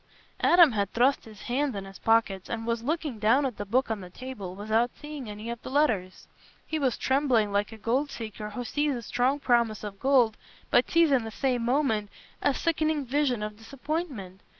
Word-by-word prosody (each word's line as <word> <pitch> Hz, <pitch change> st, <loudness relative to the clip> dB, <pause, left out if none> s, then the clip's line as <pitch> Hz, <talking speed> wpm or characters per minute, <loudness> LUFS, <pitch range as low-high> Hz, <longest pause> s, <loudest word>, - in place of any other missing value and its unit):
Adam 345 Hz, -4 st, +7 dB
had 200 Hz, -3 st, -1 dB
thrust 255 Hz, +4 st, +2 dB
his 215 Hz, -3 st, -12 dB
hands 265 Hz, +1 st, -1 dB
in 195 Hz, -1 st, -5 dB
his 195 Hz, 0 st, -12 dB
pockets, 225 Hz, -4 st, +1 dB
and 225 Hz, -1 st, -3 dB
was 230 Hz, -1 st, -1 dB
looking 295 Hz, -2 st, -2 dB
down 235 Hz, +7 st, +3 dB
at 250 Hz, -5 st, -3 dB
the 205 Hz, -, -4 dB
book 245 Hz, +3 st, +1 dB
on 215 Hz, -3 st, -2 dB
the 180 Hz, -, -9 dB
table, 205 Hz, -4 st, -7 dB
without 220 Hz, +4 st, +1 dB
seeing 295 Hz, -6 st, -7 dB
any 210 Hz, +2 st, -7 dB
of 235 Hz, -, -7 dB
the -, -, -7 dB
letters. 225 Hz, -11 st, 0 dB, 0.4 s
He 315 Hz, -, -2 dB
was 265 Hz, -4 st, +1 dB
trembling 260 Hz, -6 st, +2 dB
like 205 Hz, +1 st, 0 dB
a 225 Hz, -, -9 dB
gold 255 Hz, +7 st, 0 dB
seeker 215 Hz, -3 st, -6 dB
who 245 Hz, +4 st, -5 dB
sees 290 Hz, +3 st, 0 dB
the 240 Hz, -, -6 dB
strong 250 Hz, +5 st, +1 dB
promise 235 Hz, -6 st, +1 dB
of 200 Hz, -2 st, -7 dB
gold 255 Hz, -5 st, +3 dB, 0.3 s
but -, -, +4 dB
sees 335 Hz, -3 st, +4 dB
in 260 Hz, -4 st, +3 dB
the 225 Hz, -, -5 dB
same 245 Hz, +1 st, -1 dB
moment 235 Hz, -5 st, +1 dB, 0.3 s
a 285 Hz, -, +2 dB
sickening 310 Hz, -2 st, 0 dB
vision 255 Hz, -4 st, 0 dB
of 210 Hz, 0 st, -5 dB
disappointment. 255 Hz, -, -5 dB
240 Hz, 200 wpm, -27 LUFS, 215-280 Hz, 0.4 s, Adam